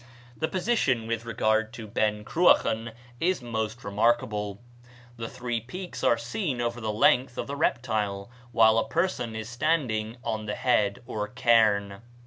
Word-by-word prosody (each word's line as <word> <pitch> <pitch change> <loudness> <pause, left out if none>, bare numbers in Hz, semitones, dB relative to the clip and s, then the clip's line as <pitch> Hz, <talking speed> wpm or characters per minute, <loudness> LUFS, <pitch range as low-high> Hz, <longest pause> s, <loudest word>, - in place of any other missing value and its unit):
The 160 - -1
position 180 - +1
with 115 0 -3
regard 110 -1 +1
to 115 -2 -7
Ben 105 0 0
Cruachan 115 -9 +3 0.3
is 175 -5 0
most 110 0 -3
remarkable. 105 -1 0 0.6
The 115 -1 -5
three 120 -2 -3
peaks 180 - -7
are 115 - +4
seen 120 - -3
over 120 0 -2
the 110 -1 -1
length 125 +4 +3
of - - -2
the 140 - -5
reptile 110 -7 -1 0.2
when 110 -1 +5
a 115 - +3
person 165 -10 -1
is 110 0 -5
standing 120 -4 -1
on 110 -1 -3
the 105 - -2
head, 105 -3 +1
or 105 -4 -3
cairn. 110 -4 +2
115 Hz, 150 wpm, -27 LUFS, 110-125 Hz, 0.6 s, when